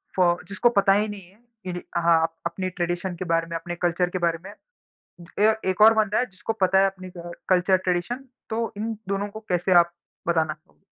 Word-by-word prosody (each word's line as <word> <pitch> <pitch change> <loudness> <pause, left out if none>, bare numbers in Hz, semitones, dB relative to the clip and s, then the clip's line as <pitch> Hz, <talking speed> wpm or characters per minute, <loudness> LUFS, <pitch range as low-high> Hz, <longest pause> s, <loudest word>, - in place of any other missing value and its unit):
फ़ 175 -2 +2
जिसको 225 +4 +2
पता 200 -3 +4
ही 210 +2 +2
नहीं 205 -2 -7
है 200 +3 -25 0.3
कि 180 -1 -4
हाँ, 170 -1 +4
अप 165 0 -1
अपने 185 -1 -2
ट्रेडिशन 175 +1 -3
के 185 - -5
बारे 165 -1 +1
में, 170 - -5
अपने 175 +1 -6
कल्चर 175 +1 0
के 185 - -3
बारे 170 -1 +1
में। 200 - -9 0.9
ए 215 +1 +5
एक 185 +3 -1
और 220 +1 +9
बंदा 215 -1 +1
है 250 - +1
जिसको 190 +1 -5
पता 190 -3 +3
है 195 - +5
अपनी 185 -1 -7 0.4
कल्चर 185 +1 +4
ट्रेडिशन, 185 +9 -2 0.2
तो 225 +1 -2
इन 225 +2 -2 0.2
दोनों 200 +1 -1
को 215 +2 -9
कैसे 180 +1 +2
आप 170 0 +2 0.4
बताना 160 -2 +1
चाहो 155 +3 -30
185 Hz, 210 wpm, -24 LUFS, 175-205 Hz, 0.9 s, और